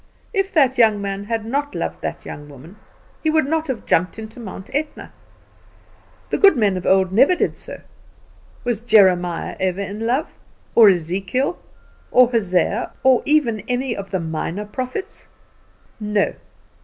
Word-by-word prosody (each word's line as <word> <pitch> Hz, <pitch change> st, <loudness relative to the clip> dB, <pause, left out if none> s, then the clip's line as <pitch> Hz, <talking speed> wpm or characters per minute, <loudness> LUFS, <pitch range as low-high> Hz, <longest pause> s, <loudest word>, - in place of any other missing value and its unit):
If 390 Hz, -2 st, 0 dB
that 265 Hz, -5 st, +3 dB
young 220 Hz, -3 st, +5 dB
man 200 Hz, 0 st, -4 dB
had 225 Hz, 0 st, -3 dB
not 285 Hz, +5 st, -2 dB
loved -, -, -4 dB
that -, -, -5 dB
young 145 Hz, 0 st, -9 dB
woman, 145 Hz, +7 st, -13 dB, 0.5 s
he 315 Hz, -, +1 dB
would 315 Hz, -2 st, +2 dB
not 320 Hz, +2 st, -1 dB
have 260 Hz, -5 st, -4 dB
jumped 180 Hz, +3 st, +1 dB
into 220 Hz, +2 st, -9 dB
Mount 195 Hz, -3 st, -9 dB
Etna. 295 Hz, +2 st, -4 dB, 1.2 s
The -, -, 0 dB
good 395 Hz, -8 st, +6 dB
men 205 Hz, -4 st, +2 dB
of 180 Hz, -, -4 dB
old 190 Hz, -1 st, +3 dB
never 265 Hz, -, +5 dB
did -, -, -1 dB
so. -, -, -8 dB, 0.8 s
Was 240 Hz, -3 st, -1 dB
Jeremiah 185 Hz, -7 st, +3 dB
ever 190 Hz, +1 st, -1 dB
in 200 Hz, +1 st, -5 dB
love, 260 Hz, +6 st, -2 dB, 0.3 s
or 225 Hz, -3 st, +8 dB
Ezekiel, 195 Hz, -, -1 dB, 0.5 s
or 250 Hz, -1 st, +5 dB
Hosea, 200 Hz, -1 st, 0 dB
or 260 Hz, -2 st, +5 dB
even 285 Hz, -8 st, +2 dB
any 250 Hz, 0 st, -1 dB
of 195 Hz, -1 st, -7 dB
the 190 Hz, -, -1 dB
minor 165 Hz, +4 st, -4 dB
prophets? 255 Hz, -, -6 dB, 0.7 s
No. 210 Hz, -1 st, 0 dB
220 Hz, 155 wpm, -20 LUFS, 190-260 Hz, 1.2 s, or